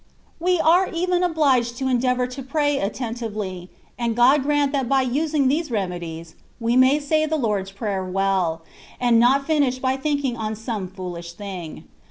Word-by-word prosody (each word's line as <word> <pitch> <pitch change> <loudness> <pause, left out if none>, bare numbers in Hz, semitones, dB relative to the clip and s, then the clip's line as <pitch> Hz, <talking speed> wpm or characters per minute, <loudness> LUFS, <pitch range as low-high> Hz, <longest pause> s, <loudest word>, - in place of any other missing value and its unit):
We 360 +1 +1
are 340 +4 +4
even 355 +1 0
obhged 275 -9 +2
to 265 - -2
endeavour 250 0 +1
to 250 +2 -7
pray 290 +1 0
atten 225 +4 -3
tively, 205 -6 -5 0.3
and 235 -2 -1
God 260 +5 +5
grant 290 0 +1
that 270 -4 -1
by 270 -1 +3
using 285 +2 +1
these 305 +4 0
reme 190 -6 -2
dies, 165 0 -8 0.3
we 230 +1 0
may 260 +3 +5
say 310 +2 +1
the 315 +1 0
Lord^s 205 -7 -1
Prayer 195 -1 -3
well, 185 -3 0 0.4
and 240 -2 +4
not 265 +4 +4
finish 285 -5 +1
by 260 0 0
thinking 285 -3 -1
on 220 -2 -3
some 220 -3 -4
fooUsh 180 -2 -7
thing. 180 -4 -7
250 Hz, 175 wpm, -22 LUFS, 200-285 Hz, 0.4 s, God